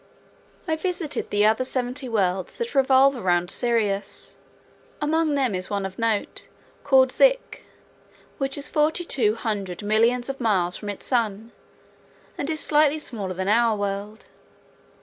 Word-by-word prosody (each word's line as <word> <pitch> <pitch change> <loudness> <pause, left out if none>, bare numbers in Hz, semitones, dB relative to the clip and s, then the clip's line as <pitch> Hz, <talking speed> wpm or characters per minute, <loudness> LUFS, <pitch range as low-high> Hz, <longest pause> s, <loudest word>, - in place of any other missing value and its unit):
I 320 -1 0
visited 345 -3 -3
the 205 0 +2
other 220 +4 +3
seventy 255 +1 -2
worlds 190 -4 -1
that 470 0 -4
revolve 270 0 +4
around 175 -6 0
Sirius. 220 -5 -2 0.6
Among 310 0 +1
them 260 -6 0
is 185 0 -4
one 200 -1 -2
of 190 +2 -7
note, 225 -3 -2 0.4
called 265 -2 +4
Zik, - - +2 0.7
which 270 0 -1
is 285 - +1
forty 315 +3 +1
two 220 -9 +1
hundred 205 -5 -4
millions 230 +4 +2
of 275 -1 -5
miles 185 -6 +1
from 210 - -6
its 200 - -6
sun, 225 -2 -1 0.8
and 285 - -4
is 315 -1 -1
slightly 300 0 +3
smaller 205 -11 -5
than 190 +1 -3
our 225 +1 +3
world. 205 +2 -4
235 Hz, 145 wpm, -24 LUFS, 205-280 Hz, 0.8 s, revolve